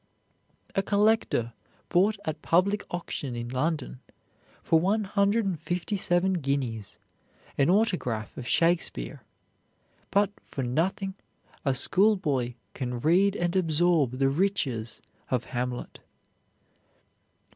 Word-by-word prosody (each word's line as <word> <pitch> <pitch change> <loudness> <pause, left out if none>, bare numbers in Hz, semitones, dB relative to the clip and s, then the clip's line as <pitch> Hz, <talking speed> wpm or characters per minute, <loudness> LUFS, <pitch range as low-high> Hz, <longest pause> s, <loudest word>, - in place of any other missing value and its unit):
A 195 - +2
collector 205 - +1 0.4
bought 200 +4 +3
at 155 - -3
public 200 +5 +2
auction 145 -7 -4
in 120 0 -5
London, 135 0 -2 0.6
for 165 - +4
one 205 +6 +1
hundred 200 +2 +1
and 185 -5 -2
fifty 180 +5 -2
seven 185 0 +2
guineas, 130 -7 -2 0.6
an 140 +2 +2
autograph 180 - 0
of 125 - -7
Shakespeare; 165 - +1 0.9
but 200 0 +2
for 135 - -5
nothing 190 +10 -1 0.5
a 135 -3 +1
schoolboy 150 - +2 0.2
can 125 -2 -4
read 185 +8 +3
and 175 -1 -1
absorb 165 -6 +2
the 135 0 +3
riches 135 - -1 0.3
of 125 -3 0
"Hamlet." 125 0 -4
165 Hz, 110 wpm, -27 LUFS, 130-195 Hz, 0.9 s, for